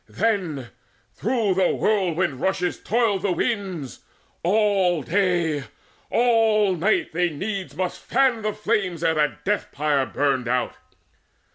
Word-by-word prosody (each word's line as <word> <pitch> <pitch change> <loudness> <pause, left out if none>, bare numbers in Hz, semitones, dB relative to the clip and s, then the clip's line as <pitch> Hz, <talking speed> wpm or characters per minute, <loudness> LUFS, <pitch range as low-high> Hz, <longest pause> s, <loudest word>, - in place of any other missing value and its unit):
Then, 180 - -1 0.5
though 230 -2 +1
with 185 -1 +2
whirlwind 185 -9 0
rushes 185 -2 -1
toiled 220 -4 +1
the 195 - 0
winds, 185 - -3 0.4
All 190 -4 +2
day, 170 -3 0 0.4
all 225 -5 +3
night, 195 +6 +1
they 175 +1 +1
needs 195 +5 -5
must 185 -1 -3
fan 255 -3 +2
the 215 0 -1
flames 200 -6 -1
Ere 165 -1 +3
that 150 -1 -1
death 210 +1 -1
pyre 145 -2 0
burned 135 -4 0
out. 125 +1 0
185 Hz, 125 wpm, -23 LUFS, 160-210 Hz, 0.5 s, all